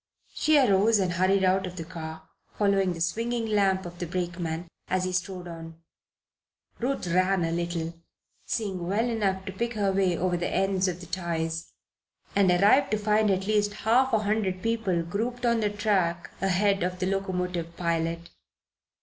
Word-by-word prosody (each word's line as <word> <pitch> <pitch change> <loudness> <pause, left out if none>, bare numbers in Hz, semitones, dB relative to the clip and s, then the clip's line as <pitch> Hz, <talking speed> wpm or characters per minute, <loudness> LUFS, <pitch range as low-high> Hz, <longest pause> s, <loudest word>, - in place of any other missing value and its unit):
She 310 -1 +3
arose 220 -4 +4
and 185 -3 0
hurried 190 +2 +2
out 190 0 +2
of 180 - -8
the 165 - -5
car, 160 -2 -8 0.3
following 195 -3 +2
the 165 - -7
swinging 230 +6 -1
lamp 195 -3 +2
of 175 0 -9
the 175 - -3
brakeman 175 -1 -3 0.2
as 185 0 0
he 185 - -1
strode 180 0 -3
on. 165 -1 -9 1.0
Ruth 265 -2 -1
ran 185 +1 +2
a 165 - -1
little, 170 -1 -2 0.5
seeing 190 -6 -3
well 205 +5 +1
enough 195 -5 -1
to 190 - -4
pick 235 +4 -3
her 200 -2 +1
way 190 -3 +1
over 180 0 0
the 175 - -2
ends 195 -1 +1
of 180 -1 -3
the - - -8
ties, 165 -2 -3 0.6
and 200 -2 +4
arrived 205 +10 +5
to 215 - +1
find 210 0 +2
at 190 0 +1
least 205 0 +1
half 255 +4 +4
a 225 - +4
hundred 205 -3 -1
people 225 -7 0
grouped 230 +8 -3
on 235 -1 +3
the 210 -1 +1
track 195 -5 0
ahead 195 +1 +2
of 180 +1 -1
the 185 - -1
locomotive 180 -3 -2
pilot. 170 0 -2
190 Hz, 175 wpm, -27 LUFS, 175-210 Hz, 1.0 s, arrived